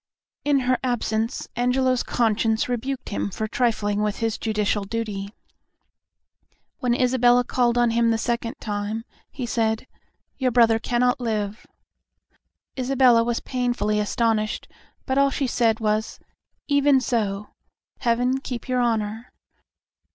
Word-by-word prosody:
In 285 -2 +2
her 255 0 +1
absence 230 -1 -1
Angelo's 250 +1 +2
conscience 225 -1 +1
rebuked 250 +2 -3
him 205 - -2
for 220 +3 -3
trifling 210 -3 0
with 210 -1 -1
his 225 -2 -2
judicial 210 -2 0
duty. 200 -2 -4 1.5
When 245 -2 +1
Isabella 245 -1 +4
called 245 -1 +1
on 240 -1 +3
him 230 0 +2
the 225 - +2
second 235 0 -2
time, 210 +2 -3 0.2
he 255 - -5
said, 225 -1 0 0.5
"Your 260 -2 +2
brother 230 -2 +4
cannot 245 +2 +1
live." 215 -3 -3 1.1
Isabella 255 -2 +4
was 235 0 -1
painfully 245 -4 -1
astonished, 215 0 0 0.4
but 265 0 +1
all 280 0 +4
she 275 0 -1
said 230 -3 +1
was, 215 0 -1 0.5
"Even 285 -1 +4
so. 210 -5 -1 0.5
Heaven 245 +2 +1
keep 250 -3 -6
your 255 -1 0
Honor." 225 -1 -1
235 Hz, 125 wpm, -24 LUFS, 220-250 Hz, 1.5 s, Isabella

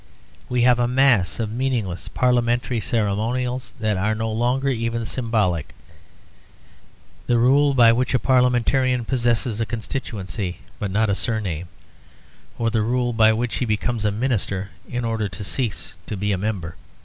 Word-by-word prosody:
We 125 -1 +1
have 125 0 +5
a 120 - +2
mass 125 -8 +3
of 110 -2 -2
meaningless 115 -7 -2
parliamentary 120 -1 +1
ceremonials 115 +4 -1
that 110 -3 0
are 110 +4 0
no 110 +1 -2
longer 125 +5 +1
even 115 -2 -1
symbolic; 110 - -1 1.5
the 120 - +3
rule 140 +4 +4
by 115 -2 +7
which 125 +2 0
a - - +6
parliamentarian 125 0 +2
possesses 120 -2 0
a - - +1
constituency 100 -6 -4 0.2
but 105 -4 -2
not 105 +2 +1
a - - +2
surname; 95 -6 -2 0.9
or 115 -1 0
the 110 -1 +1
rule 120 +2 0
by 110 -1 +5
which 115 +1 -1
he 125 - 0
becomes 110 +1 -1
a 105 - +3
minister 100 -4 -2 0.2
in 120 0 -2
order 110 -3 -1
to 95 +2 -6
cease 115 0 -3
to 105 - -4
be 105 +2 -1
a 95 - +1
member. 95 -5 -3
115 Hz, 155 wpm, -22 LUFS, 105-125 Hz, 1.5 s, by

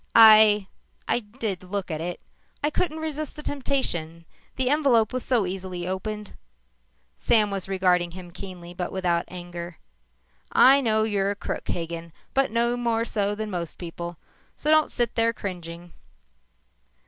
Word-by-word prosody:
"I 215 -2 +8 0.4
I - - +2
did 210 -4 -5
look 185 -1 -4
at 155 0 -3
it. 175 +1 -4 0.4
I 295 - +2
couldn't 315 -1 -1
resist 310 -2 -4
the 300 - -9
temptation. 175 - -1 0.3
The 260 0 +1
envelope 255 -8 +3
was 255 - -2
so 240 -6 +2
easily 180 -1 -5
opened." 210 +2 -4 0.8
Sam 215 -3 +3
was 195 -1 -3
regarding 180 -2 +2
him 175 0 -10
keenly 175 -2 -9
but 180 0 -4
without 175 -3 0
anger. 175 -1 -8 0.7
"I 275 +2 +7
know 220 -3 +2
you're 200 -2 0
a 205 - -1
crook, - - -5
Hagen, 170 -1 -4 0.2
but 270 0 +2
no 235 +2 +1
more 230 -1 0
so 205 -3 -1
than 215 0 -4
most 170 -3 -4
people. 170 0 -7 0.4
So 305 - 0
don't 310 -1 +5
sit 240 -2 -1
there 230 0 +2
cringing." 175 -4 -7
200 Hz, 150 wpm, -25 LUFS, 175-235 Hz, 0.8 s, I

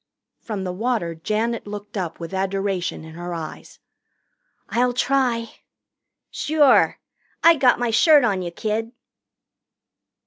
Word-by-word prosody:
From 210 -4 -5
the 185 - -3
water 215 -4 -1
Janet 215 +8 -2
looked 205 0 -8
up 180 -5 -4
with 170 +2 -7
adoration 195 -2 -2
in 160 0 -11
her 175 +1 -6
eyes. 160 -2 -8 0.9
"I'll 245 +1 +1
try." 245 -3 0 0.7
"Sure. 295 -3 +3 0.5
I 335 0 +8
got 260 -4 +4
my 245 -1 -1
shirt 295 +5 +6
on 200 -5 +1
you, 175 - -4
kid." 220 +6 -3
215 Hz, 125 wpm, -22 LUFS, 185-245 Hz, 0.9 s, I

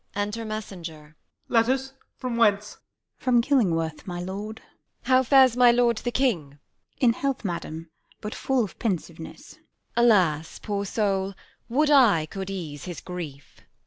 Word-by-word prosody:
Enter 210 +3 -2
Messenger. 170 -8 -7 0.3
Letters! 260 +3 +1 0.2
from 250 -2 -3
whence? 210 -2 +2
Mess. - - -31
From 250 -2 +4
Killingworth, 180 - +1
my 175 -1 -4
lord? 200 +4 -5
Q. - - -17
Isab. - - -25
How 260 0 +6
fares 260 -1 +5
my 250 -1 +6
lord 235 -1 +3
the 240 - -2
king? 235 - 0
Mess. 140 - -21 0.4
In 240 -3 +5
health, 275 -2 -2
madam, 165 -2 -5 0.3
but 210 0 -6
full 265 -3 0
of 200 - -8
pensiveness. 180 - -4
Q. - - -31
Isab. - - -38 0.3
Alas, 180 -10 +3
poor 200 -2 -2
soul, 195 -2 -1 0.3
would 295 +5 +2
I 225 - +5
could 190 +4 -6
ease 160 -7 -6
his 175 -3 -6
grief! 160 -6 -8
210 Hz, 160 wpm, -25 LUFS, 170-240 Hz, 0.4 s, How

